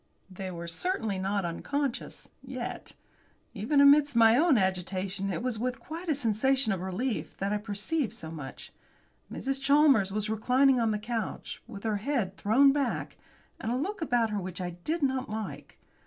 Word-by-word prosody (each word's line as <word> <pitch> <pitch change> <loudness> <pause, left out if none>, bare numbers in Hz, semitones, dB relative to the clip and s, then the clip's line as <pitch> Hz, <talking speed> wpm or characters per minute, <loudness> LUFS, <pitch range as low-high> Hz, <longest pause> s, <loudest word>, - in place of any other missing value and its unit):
They 185 0 -6
were 170 -1 -6
certainly 220 - -2
not 195 0 -1
unconscious 275 +10 -3
yet! - - -6 0.6
Even 240 +7 +1
amidst 285 -1 +6
my 225 -1 +7
own 300 0 +4
agitation 190 +1 -1
it 235 - -3
was 250 -4 -1
with 250 +2 -2
quite 330 +3 -7
a 305 - +3
sensation 255 0 +1
of 185 - -4
relief 205 +7 -3
that 195 +1 -1
I 210 - 0
perceived 215 +7 -2
so 160 0 -8
much. 145 -5 -9 0.6
Mrs. 270 0 -3
Chalmers 275 -8 +5
was 210 +1 -1
reclining 250 +5 +3
on 230 -1 +2
the 215 - 0
couch, 225 +1 -4
with 200 -4 -9
her 220 -2 0
head 215 -5 -1
thrown 255 +8 +5
back, 280 -3 -1 0.4
and 225 - -3
a - - +1
look 370 +8 -3
about 240 -7 +1
her 210 - -1
which 185 -1 -6
I 180 -1 -3
did 300 - -3
not 265 -2 0
like. 215 -1 -6
225 Hz, 170 wpm, -29 LUFS, 195-275 Hz, 0.6 s, my